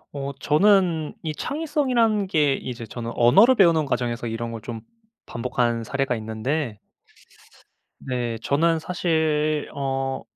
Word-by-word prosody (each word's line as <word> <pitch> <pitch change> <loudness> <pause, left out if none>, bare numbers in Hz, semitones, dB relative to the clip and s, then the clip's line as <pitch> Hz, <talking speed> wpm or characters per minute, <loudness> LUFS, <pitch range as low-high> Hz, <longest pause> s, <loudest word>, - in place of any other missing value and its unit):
어 140 0 -4
저는 175 -1 +2
이 155 - -3
창의성이라는 255 - 0
게 150 -6 +2
이제 120 -3 -6
저는 115 +1 -6
언어를 195 - +6
배우는 170 -7 +4
과정에서 120 -3 -2
이런 115 +1 -4
걸 115 -1 -7
좀 115 0 -7 0.4
반복한 120 -1 -1
사례가 135 +1 -1
있는데 110 +3 -3 1.2
네. 120 -3 -3
저는 165 +3 +2
사실 155 -3 0
어 135 -1 -2
140 Hz, 255 characters per minute, -23 LUFS, 120-170 Hz, 1.2 s, 언어를